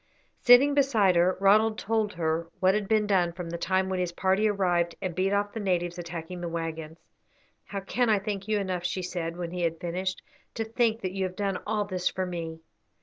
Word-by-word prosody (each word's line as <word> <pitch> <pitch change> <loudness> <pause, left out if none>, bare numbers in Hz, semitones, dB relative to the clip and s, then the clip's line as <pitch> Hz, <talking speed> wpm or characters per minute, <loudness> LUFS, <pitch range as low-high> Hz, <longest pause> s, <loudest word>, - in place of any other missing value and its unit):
Sitting 255 +4 +7
beside 230 -10 +3
her, 175 +2 +3
Ronald 215 +3 +4
told 220 -1 -1
her 165 0 -1
what 185 +1 +4
had 210 -1 -1
been 215 0 +2
done 180 -4 +2
from 170 -1 -6
the 170 - -3
time 185 +2 +1
when 190 -1 -2
his 180 -1 -1
party 190 +4 +2
arrived 175 -4 +1
and 185 -3 -3
beat 185 +3 0
off 205 0 0
the 225 - -4
natives 175 -3 -1
attacking 170 +1 -6
the 170 - -3
waggons. 165 -1 -5 0.7
"How 200 -1 -5
can 240 +5 0
I 215 - +4
thank 200 0 -4
you 215 -1 +1
enough?" 185 -3 -2
she 185 +1 -2
said, 170 -2 -4
when 170 -1 -4
he 180 0 -4
had 165 -1 -1
finished. 185 +2 -3 0.3
"To 225 - -1
think 225 0 0
that 185 - -2
you 190 0 -2
have 185 0 -5
done 195 -2 -1
all 210 -1 0
this 185 -2 -1
for 185 - -3
me." 165 -2 -5
185 Hz, 215 wpm, -27 LUFS, 175-205 Hz, 0.7 s, Sitting